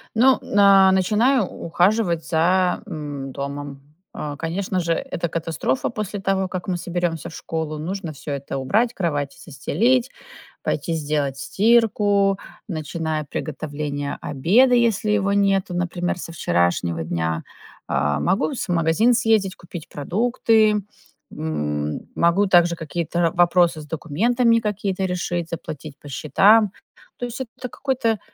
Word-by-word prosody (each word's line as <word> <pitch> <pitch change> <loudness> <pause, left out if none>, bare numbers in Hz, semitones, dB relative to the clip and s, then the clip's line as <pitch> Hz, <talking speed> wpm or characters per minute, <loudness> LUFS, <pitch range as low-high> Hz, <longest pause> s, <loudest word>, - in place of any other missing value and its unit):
Ну, 255 +4 +5
на 195 -1 +6
начинаю 215 +7 +3
ухаживать 175 0 0
за, 180 +3 +2
м, 145 -3 -6
домом. 140 +1 -6 0.3
А, 145 -1 -5
конечно 185 +4 -2
же, 170 -1 +1
это 220 -5 -3
катастрофа 160 -5 -2
после 210 -2 -4
того, 195 -1 0
как 185 -1 -5
мы 180 -2 -1
соберёмся 175 -3 -2
в - - -13
школу. 160 -2 -4
Нужно 175 +1 -4
всё 140 +1 -10
это 140 -1 -4
убрать, 220 - +1
кровати 145 - -2
застелить, 235 - +1 0.5
пойти 165 - -2
сделать 145 -3 -1
стирку, 205 - +3 0.3
начинаю 155 -2 -3
приготовление 145 -1 -4
обеда, 215 - +3
если 230 -3 +2
его 200 -1 +1
нету, 195 -2 +2
например, 175 0 -2
со 170 - -7
вчерашнего 85 - 0
дня. 80 0 -2 0.4
А, 70 +1 0
могу 195 - +1
с 240 - -4
магазин 175 +8 +3
съездить, 220 -5 +2
купить 170 -2 -10
продукты. 215 - +2 0.5
М, 75 -1 -3
могу 170 +4 +3
также 175 -2 +4
какие-то 170 +1 -3
вопросы 175 -2 +3
с - - -10
документами 230 - +2
какие-то 200 -3 -2
решить, 175 -2 -2
заплатить 155 -3 -7
по - - -13
счетам. 195 - +4 0.5
То 245 - -3
есть, 245 +2 -6
это 260 - -4
т 250 - -3
какой-то 245 -5 -1
175 Hz, 130 wpm, -22 LUFS, 150-205 Hz, 0.5 s, на